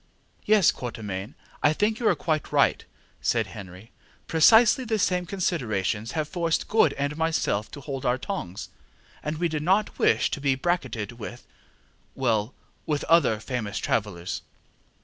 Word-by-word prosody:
ŌĆØ -, -, -38 dB
ŌĆ£Yes, 200 Hz, -6 st, +5 dB
Quatermain, 105 Hz, -3 st, -6 dB, 0.3 s
I 145 Hz, -, +4 dB
think 215 Hz, +6 st, 0 dB
you 235 Hz, -, +1 dB
are -, -, +4 dB
quite 155 Hz, -3 st, -2 dB
right, -, -, +3 dB
ŌĆØ -, -, -15 dB, 0.4 s
said -, -, +1 dB
Sir -, -, -13 dB
Henry. 95 Hz, +2 st, -11 dB, 0.4 s
ŌĆ£Precisely 220 Hz, +9 st, +5 dB
the 220 Hz, -1 st, +1 dB
same 180 Hz, -3 st, 0 dB
considerations 115 Hz, -, -1 dB
have 155 Hz, -2 st, -1 dB
forced 170 Hz, 0 st, -1 dB
Good 220 Hz, -, +4 dB
and 140 Hz, +1 st, -2 dB
myself 160 Hz, -10 st, 0 dB
to 145 Hz, -, -9 dB
hold 135 Hz, -2 st, -5 dB
our 125 Hz, -1 st, +2 dB
tongues. 130 Hz, -, -5 dB, 0.7 s
We 175 Hz, +2 st, +1 dB
did 155 Hz, -2 st, -3 dB
not 190 Hz, +6 st, +1 dB
wish -, -, +3 dB
to 140 Hz, -, -3 dB
be 140 Hz, -2 st, +2 dB
bracketed 135 Hz, -8 st, -2 dB
with 120 Hz, +2 st, -8 dB, 0.7 s
well, 115 Hz, -3 st, 0 dB, 0.3 s
with 150 Hz, -2 st, 0 dB
other 165 Hz, -10 st, +4 dB
famous 110 Hz, -3 st, -4 dB
travellers. 95 Hz, -5 st, -2 dB
140 Hz, 155 wpm, -26 LUFS, 110-175 Hz, 0.7 s, ŌĆ£Yes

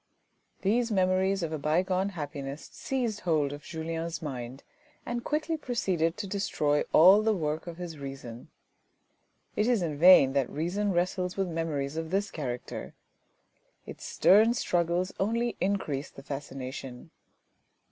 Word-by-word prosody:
These 230 Hz, +4 st, +2 dB
memories 190 Hz, 0 st, +2 dB
of 160 Hz, -, -2 dB
a 155 Hz, -, -2 dB
bygone 185 Hz, +6 st, +1 dB
happiness 145 Hz, -1 st, -6 dB
seized 240 Hz, -6 st, -2 dB
hold 155 Hz, -6 st, +1 dB
of 145 Hz, -, -8 dB
Julien's 165 Hz, +1 st, -4 dB
mind, 130 Hz, -4 st, -6 dB, 0.4 s
and 240 Hz, 0 st, -3 dB
quickly 310 Hz, +2 st, -1 dB
proceeded 185 Hz, -, -1 dB
to 205 Hz, -, -4 dB
destroy 155 Hz, -7 st, 0 dB
all 190 Hz, +6 st, +8 dB
the 220 Hz, 0 st, +2 dB
work 155 Hz, -1 st, -2 dB
of 170 Hz, -1 st, -7 dB
his 170 Hz, -4 st, -7 dB
reason. 135 Hz, -4 st, -8 dB, 1.1 s
It 210 Hz, -, +1 dB
is 235 Hz, -7 st, +2 dB
in 155 Hz, -3 st, -2 dB
vain 170 Hz, -6 st, +8 dB
that 140 Hz, -2 st, +1 dB
reason 190 Hz, +7 st, -1 dB
wrestles 180 Hz, +1 st, -1 dB
with 195 Hz, -1 st, 0 dB
memories 160 Hz, -4 st, -2 dB
of 160 Hz, 0 st, -3 dB
this 195 Hz, +3 st, 0 dB
character. 125 Hz, -5 st, -5 dB, 0.9 s
Its -, -, -10 dB
stern 220 Hz, +5 st, +5 dB
struggles 175 Hz, -3 st, 0 dB
only 230 Hz, +4 st, 0 dB
increase 175 Hz, -8 st, -1 dB
the 135 Hz, -, -13 dB
fascination. 135 Hz, -1 st, -7 dB
170 Hz, 135 wpm, -29 LUFS, 145-195 Hz, 1.1 s, all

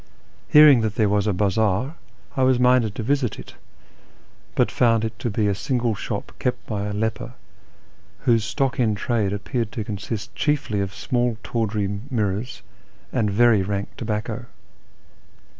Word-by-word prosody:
Hearing 150 Hz, -5 st, +8 dB
that 110 Hz, -2 st, -1 dB
there 110 Hz, -2 st, +2 dB
was 105 Hz, 0 st, +1 dB
a -, -, +3 dB
bazaar, 105 Hz, -, +1 dB, 0.4 s
I 135 Hz, -, 0 dB
was 130 Hz, -1 st, +4 dB
minded 125 Hz, -4 st, +3 dB
to 115 Hz, -, -4 dB
visit 135 Hz, -2 st, 0 dB
it, -, -, -10 dB, 1.0 s
but -, -, +2 dB
found 115 Hz, -2 st, +3 dB
it 110 Hz, +1 st, -6 dB
to 120 Hz, -, -2 dB
be 105 Hz, 0 st, 0 dB
a 100 Hz, -, +2 dB
single 120 Hz, +3 st, -1 dB
sho]3 105 Hz, 0 st, -4 dB, 0.2 s
kejit 125 Hz, -1 st, 0 dB
by 100 Hz, -2 st, -3 dB
a -, -, -3 dB
leper, 110 Hz, +3 st, -3 dB, 0.9 s
whose 115 Hz, -3 st, +3 dB
stock 130 Hz, +4 st, -1 dB
in 110 Hz, -4 st, +2 dB
trade 105 Hz, -1 st, 0 dB
appeared 110 Hz, +2 st, -3 dB
to 110 Hz, -, -3 dB
consist 105 Hz, +2 st, -5 dB
chiefly 140 Hz, -9 st, 0 dB
of 100 Hz, -1 st, -3 dB
small 120 Hz, +1 st, -1 dB
tawdry 105 Hz, -3 st, -2 dB
mirrors 110 Hz, -1 st, -2 dB, 0.5 s
and 105 Hz, -, +1 dB
very 110 Hz, 0 st, +4 dB
rank 100 Hz, +1 st, -2 dB
tobacco. 110 Hz, +1 st, -4 dB
110 Hz, 155 wpm, -23 LUFS, 105-125 Hz, 1.0 s, Hearing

